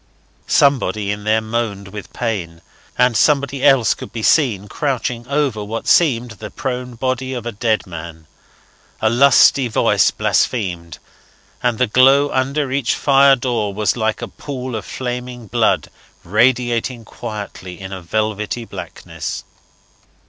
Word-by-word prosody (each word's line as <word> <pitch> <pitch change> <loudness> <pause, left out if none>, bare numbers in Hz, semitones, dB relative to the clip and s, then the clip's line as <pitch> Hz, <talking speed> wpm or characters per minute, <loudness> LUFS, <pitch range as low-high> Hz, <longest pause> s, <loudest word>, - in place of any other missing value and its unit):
Somebody 115 -7 +2
in 105 0 -5
there 110 +1 +2
moaned 110 -3 -3
with 105 0 -9
pain, 90 -9 -4 0.3
and 125 -1 +3
somebody 140 0 +2
else 135 -5 +5
could - - -10
be 115 -1 -5
seen 110 - +2
crouching 125 -2 -2
over 140 -6 0
what 110 +2 -5
seemed 125 -8 +3
the 110 - -9
prone 125 -2 -5
body 130 +2 -2
of 120 -2 -6
a 120 - -3
dead 110 0 0
man; 80 -2 -9 0.7
a 110 - +2
lusty 135 +1 +5
voice 110 - +3
blasphemed; 85 - -1 0.6
and 120 -2 0
the 125 - +3
glow 135 +5 +4
under 135 +1 -1
each 135 -2 0
fire 140 -1 +5
door 120 -6 -2
was 105 -2 +1
like 110 -2 -1
a - - -3
pool 130 -3 -6
of 110 - -5
flaming 125 -1 -5
blood 100 - +1 0.3
radiating 120 +3 +1
quietly 105 -6 -8
in 95 0 -7
a 95 - -6
velvety 110 +5 -2
blackness. 90 -5 -7
120 Hz, 140 wpm, -19 LUFS, 105-130 Hz, 0.7 s, else